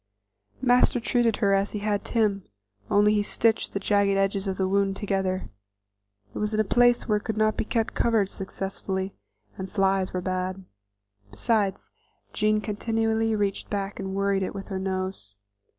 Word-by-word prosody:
Master 245 0 +4
treated 235 -1 +1
her 200 - +4
as 195 +1 +1
he - - -2
had 205 -1 -1
Tim, 210 -4 0 0.5
only 210 +1 +4
he 210 - +2
stitched 225 +2 +1
the 200 - -1
jagged 200 0 +2
edges 195 0 0
of 190 - -2
the 190 - +1
wound 195 0 +1
together. 190 -2 -2 0.8
It - - -5
was 210 +1 -1
in - - 0
a - - +4
place 245 +3 +3
where 210 -2 +2
it - - -20
could 220 -1 -3
not 215 0 +2
be - - -2
kept 225 0 -1
covered 225 -4 +2
successfully, 190 0 -4 0.5
and 190 0 -4
flies 195 -1 +1
were 185 - -2
bad; 185 +1 -3 0.6
besides 200 - -1 0.4
Jean 215 0 +2
continually 225 +1 0
reached 200 -2 -1
back 200 0 -3
and 190 -1 -4
worried 200 0 +1
it 190 - -3
with 195 +1 -7
her 190 -1 -3
nose. 185 - -4
200 Hz, 170 wpm, -26 LUFS, 190-215 Hz, 0.8 s, Master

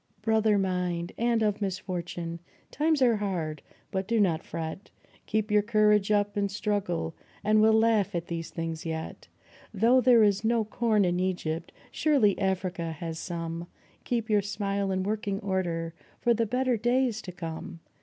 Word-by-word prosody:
Brother 220 -1 +3
mine, 180 -3 -1
and 235 -1 +1
of 210 -1 0
misfortune! 175 -3 -4 0.3
times 305 -1 +2
are 235 -3 +4
hard, 170 -7 -3 0.3
but 190 0 -2
do 230 0 +1
not 170 -6 +2
fret, 165 +3 -6 0.4
Keep 215 0 0
your 210 0 +5
courage 210 -1 +3
up 205 0 +2
and 200 -1 0
struggle, 195 -5 -2 0.3
and 215 +1 +4
we'll 220 0 +5
laugh 220 -5 +2
at 170 0 -2
these 165 -1 -4
things 165 -1 -4
yet. 160 -1 -5 0.4
Though 230 +5 +4
there 245 -3 +6
is 205 0 +2
no 225 0 +2
corn 215 -2 +2
in 175 0 +1
Egypt, 170 -3 -2 0.2
surely 270 -11 +3
Africa 185 -3 -1
has 160 +1 -5
some 170 -1 -4 0.4
Keep 235 -2 -1
your 210 -2 +3
smile 200 -1 -2
in 190 0 0
working 205 -1 -2
order 175 -4 -2 0.3
for 240 - +3
the 230 0 0
better 250 +1 +1
days 240 0 +1
to 180 - -7
come 165 -1 -7
200 Hz, 160 wpm, -28 LUFS, 175-220 Hz, 0.4 s, there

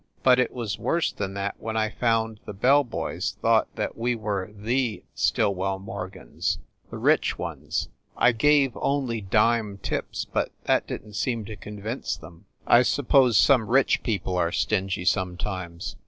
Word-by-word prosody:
But 130 -1 +6
it 125 - +2
was 115 -6 -4
worse 170 0 +1
than 100 -1 -5
that 100 0 -3
when 110 0 -3
I 110 -1 +1
found 115 -2 0
the 105 - -7
bell 135 +8 +4
boys 125 - -4
thought - - +3
that - - -3
we 120 +1 0
were 105 -3 -3
the 115 +3 -1
Stillwell 95 -1 +1
Morgans 95 -2 -4 0.3
the - - -7
rich - - +2
ones. - - -3 0.3
I 125 - +5
gave 140 +2 +3
only 130 -5 -1
dime 105 +1 +2
tips, - - -3
but - - -2
that - - +1
didn 105 - -6
t - - -14
seem 115 +1 -1
to 110 - -7
convince 105 +4 -5
them. 85 +2 -14 0.2
I 120 - +6
suppose 130 -3 +3
some 125 -3 +5
rich 135 +3 +3
people 95 -5 -2
are 85 -1 +1
stingy 95 -3 -1
sometimes. 90 -2 -2
110 Hz, 160 wpm, -25 LUFS, 100-120 Hz, 0.3 s, But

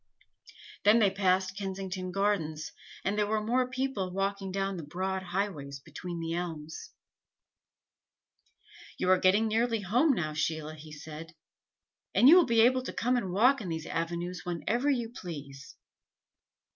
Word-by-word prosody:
Then 210 +3 +6
they 205 -4 +4
passed 190 -1 +1
Kensington 190 -1 -4
Gardens, 165 -6 -1 0.3
and 195 - +1
there 210 -1 +1
were 215 +1 +1
more 250 +3 +1
people 255 -8 -2
walking 195 0 -2
down 195 0 -2
the - - -4
broad 185 +5 -3
highways 175 -7 -3
between 175 +5 -7
the 165 0 -3
elms. 160 -3 -5 2.1
"You 185 - +2
are 185 - +5
getting 200 +5 +4
nearly 225 0 +1
home 245 - +3
now, 155 -8 -2
Sheila," 155 0 -2
he 155 0 -12
said. 155 +2 -9 0.8
"And 250 - +6
you 320 - +10
will 360 -5 +6
be 230 -2 +4
able 255 +2 +4
to 255 - -6
come 250 +2 +1
and 195 -7 -1
walk 245 +8 +4
in 190 - -5
these 160 -1 -4
avenues 170 +2 -3
whenever 225 - -1
you 245 -5 +1
please." 140 - -9
190 Hz, 150 wpm, -30 LUFS, 165-220 Hz, 2.1 s, you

